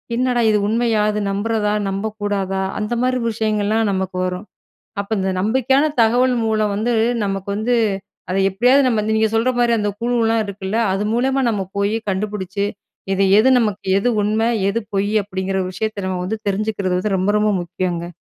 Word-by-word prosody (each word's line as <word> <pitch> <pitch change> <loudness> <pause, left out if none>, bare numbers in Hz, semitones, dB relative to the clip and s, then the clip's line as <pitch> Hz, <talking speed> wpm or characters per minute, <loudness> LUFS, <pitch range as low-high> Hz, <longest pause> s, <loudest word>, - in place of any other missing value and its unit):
என்னடா 250 0 +1
இது 210 - +3
உண்மையா? 225 0 +1
அது 210 - -2
நம்புறதா, 210 +1 0 0.2
நம்பக்கூடாதா? 200 -1 -2 0.2
அந்த 210 +3 -2
மாரி 255 0 +1
விஷயங்கள்லாம், 215 0 0
நமக்கு 190 -1 -2
வரும். 180 +2 -4 0.6
அப்போ, 200 +2 -6
இந்த 190 0 0
நம்பிக்கையான 260 +7 +2 0.2
தகவல் 245 +3 +3
மூலம் 215 -2 +1
வந்து, 225 +4 0 0.3
நமக்கு 195 0 -3
வந்து, 240 +3 +1 0.5
அத 185 - -1
எப்படியாவது 250 +8 +4
நம்ம 225 -3 +1
இந்த, 220 - 0
நீங்க 220 -1 +2
சொல்ற 235 +3 +2
மாரி 240 -1 +3
அந்த 205 -1 0
குழுலாம் 230 -2 +1
இருக்குல்ல? 200 +1 -4 0.2
அது 195 - -1
மூலமா 265 +3 +1
நம்ம 205 -3 -1 0.2
போயி, 200 +2 +1
கண்டுபிடிச்சி, 200 0 -2 0.5
இது 195 - +1 0.2
எது 225 +5 +5
நமக்கு, 210 -4 -1
எது 205 - 0
உண்ம, 215 +2 0 0.3
எது 205 - 0 0.2
பொய்யி 205 +2 0
அப்படிங்கிற 190 -1 -3
ஒரு 185 - -4
விஷயத்த, 210 +1 -3
நம்ம 185 -1 -2
வந்து 220 +4 -3
தெரிஞ்சுக்கிறது 200 -2 -1
வந்து, 195 +1 0
ரொம்ப, 190 +3 +1
ரொம்ப 210 0 +2
முக்கியம்ங்க. 175 -1 -3
210 Hz, 170 wpm, -19 LUFS, 195-225 Hz, 0.6 s, எது